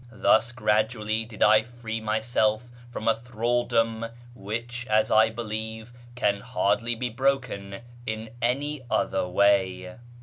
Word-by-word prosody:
Thus 115 Hz, +1 st, +3 dB
gradually 110 Hz, -1 st, 0 dB
did 110 Hz, -2 st, -2 dB
I 110 Hz, +1 st, +6 dB
free 115 Hz, -1 st, -6 dB
myself 110 Hz, +1 st, 0 dB, 0.2 s
from 115 Hz, -2 st, -5 dB
a 115 Hz, -, +6 dB
thraldom 115 Hz, -1 st, 0 dB, 0.3 s
which, 120 Hz, +4 st, -5 dB
as 110 Hz, 0 st, +3 dB
I 110 Hz, +1 st, +6 dB
believe, 110 Hz, 0 st, -6 dB, 0.2 s
can 100 Hz, -5 st, +1 dB
hardly 120 Hz, 0 st, 0 dB
be 125 Hz, +2 st, -2 dB
broken 125 Hz, -6 st, -1 dB, 0.3 s
in 110 Hz, 0 st, -4 dB
any 140 Hz, +4 st, 0 dB
other 95 Hz, -6 st, 0 dB
way. 95 Hz, -1 st, +2 dB
110 Hz, 125 wpm, -26 LUFS, 110-120 Hz, 0.3 s, I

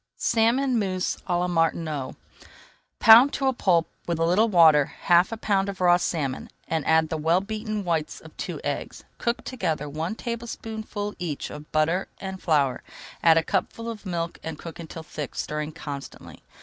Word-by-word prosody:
SALMON 235 Hz, +2 st, +2 dB
MOUSSE 185 Hz, -3 st, -1 dB
À 175 Hz, -2 st, +1 dB
LA 180 Hz, -, 0 dB
MARTINOT 165 Hz, -5 st, -1 dB, 0.8 s
Pound 230 Hz, +5 st, +8 dB
to 275 Hz, -, -1 dB
a 265 Hz, -, +3 dB
pulp 175 Hz, -8 st, +2 dB, 0.2 s
with 170 Hz, -1 st, 0 dB
a 165 Hz, -, +1 dB
little 205 Hz, +7 st, +3 dB
water, 160 Hz, -6 st, +6 dB
half 175 Hz, +5 st, +2 dB
a 225 Hz, -, -4 dB
pound 200 Hz, -2 st, 0 dB
of 195 Hz, -, -6 dB
raw 175 Hz, -1 st, +5 dB
salmon, 150 Hz, -7 st, -2 dB, 0.2 s
and 160 Hz, -2 st, -1 dB
add 160 Hz, 0 st, +4 dB
the 160 Hz, -, -2 dB
well 165 Hz, +4 st, +3 dB
beaten 215 Hz, +1 st, -4 dB
whites 165 Hz, -4 st, -2 dB
of -, -, -15 dB
two -, -, -5 dB
eggs. -, -, -4 dB, 0.2 s
Cook 235 Hz, 0 st, -1 dB
together 160 Hz, -, -2 dB
one 160 Hz, +7 st, -3 dB
tablespoonful 220 Hz, -3 st, -5 dB
each 165 Hz, -5 st, -4 dB
of 150 Hz, 0 st, -10 dB
butter 165 Hz, +4 st, +1 dB
and 190 Hz, -1 st, -6 dB
flour, 145 Hz, -6 st, +1 dB, 0.4 s
add 165 Hz, -1 st, +6 dB
a 165 Hz, -, +3 dB
cupful 230 Hz, +7 st, -2 dB
of 210 Hz, -3 st, -9 dB
milk, 170 Hz, -2 st, -3 dB
and 160 Hz, -1 st, -6 dB
cook 165 Hz, +1 st, -9 dB
until 165 Hz, 0 st, -8 dB
thick, 150 Hz, -3 st, -7 dB
stirring 150 Hz, 0 st, -3 dB
constantly. 145 Hz, -3 st, -8 dB
175 Hz, 175 wpm, -25 LUFS, 160-210 Hz, 0.8 s, Pound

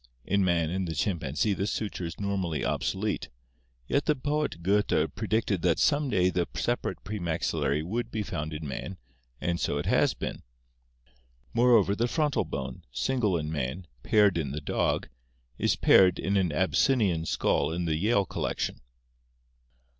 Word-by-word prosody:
In 100 Hz, +1 st, +2 dB
man 85 Hz, -3 st, +1 dB
and 95 Hz, 0 st, -2 dB
the 80 Hz, -, -4 dB
chimpanzee 80 Hz, +2 st, 0 dB
this 100 Hz, +1 st, -1 dB
suture 100 Hz, -5 st, -3 dB
is 85 Hz, -2 st, -7 dB
nor 100 Hz, -1 st, -1 dB
mally 85 Hz, -5 st, -2 dB
obsolete, 105 Hz, +2 st, -1 dB, 0.6 s
yet 140 Hz, -, 0 dB
the 150 Hz, -, +3 dB
poet 145 Hz, -, -2 dB
Goethe 100 Hz, +3 st, +2 dB
predicted 110 Hz, -3 st, 0 dB
that 85 Hz, -2 st, +2 dB
some 145 Hz, -1 st, +2 dB
day 90 Hz, -5 st, +2 dB
the 90 Hz, -1 st, 0 dB
separate 120 Hz, 0 st, -2 dB
premaxillary 85 Hz, -6 st, -1 dB
would 115 Hz, +7 st, -3 dB
be 110 Hz, -2 st, -2 dB
found 75 Hz, -5 st, -4 dB
in 75 Hz, 0 st, -5 dB
man, 90 Hz, +7 st, -5 dB, 0.4 s
and 85 Hz, 0 st, -1 dB
so 70 Hz, -, 0 dB
it 75 Hz, -, -3 dB
has -, -, +3 dB
been. -, -, -5 dB, 1.1 s
Moreover, 115 Hz, -5 st, +4 dB
the 115 Hz, +3 st, +1 dB
frontal 150 Hz, +1 st, 0 dB
bone, 65 Hz, -1 st, -5 dB
single 110 Hz, -, 0 dB
in 75 Hz, -1 st, -3 dB
man, 75 Hz, +4 st, -3 dB, 0.2 s
paired 105 Hz, -, +3 dB
in 70 Hz, -4 st, -2 dB
the 75 Hz, +3 st, -4 dB
dog, 70 Hz, -, 0 dB, 0.5 s
is -, -, +2 dB
paired 90 Hz, -2 st, +5 dB
in 100 Hz, -, -1 dB
an 95 Hz, -4 st, +2 dB
Abyssinian 95 Hz, -, +2 dB
skull -, -, +1 dB
in 85 Hz, +1 st, -2 dB
the 80 Hz, -2 st, +1 dB
Yale 100 Hz, +4 st, +2 dB
collection. -, -, -3 dB
95 Hz, 160 wpm, -28 LUFS, 80-110 Hz, 1.1 s, paired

